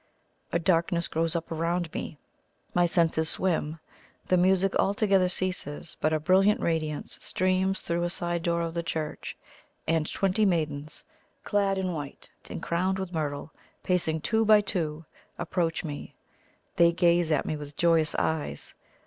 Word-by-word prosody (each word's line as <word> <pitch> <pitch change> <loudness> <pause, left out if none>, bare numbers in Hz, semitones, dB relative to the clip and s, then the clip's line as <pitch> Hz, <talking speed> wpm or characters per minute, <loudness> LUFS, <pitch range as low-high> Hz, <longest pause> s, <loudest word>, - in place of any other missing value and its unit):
A - - +2
darkness 170 0 +1
grows 165 +1 -1
up 165 0 -3
around 165 +1 -1
me; 155 - -5 0.6
my 175 0 +4
senses 165 -2 +2
swim. 165 -4 -1 0.5
The 185 - +5
music 190 +1 +3
altogether 195 -2 +3
ceases; 180 -4 -2
but 155 - +2
a 155 - +1
brilliant 195 +8 +4
radiance 155 -5 -2
streams 185 +1 0
through 170 0 -1
a 175 - 0
side 175 -1 -1
door 170 0 0
of 165 -1 -3
the 170 - -1
church, 160 -2 -4 0.5
and 160 -1 +1
twenty 195 +2 +1
maidens, 155 -6 -1 0.4
clad 200 -2 +1
in 185 -2 -1
white 145 -3 -7 0.2
and - - -6
crowned 185 +3 0
with 190 -1 -5
myrtle, 150 -1 -3 0.3
pacing 160 -3 +1
two 225 +4 +2
by 215 -1 +6
two, 165 -6 -2 0.3
approach 170 -1 -1
me. 145 -3 -7 0.6
They 170 0 +6
gaze 170 -1 +3
at 150 - +2
me 155 - -1
with 145 -1 -8
joyous 165 -3 +3
eyes. 160 -2 -1
170 Hz, 150 wpm, -28 LUFS, 160-185 Hz, 0.6 s, by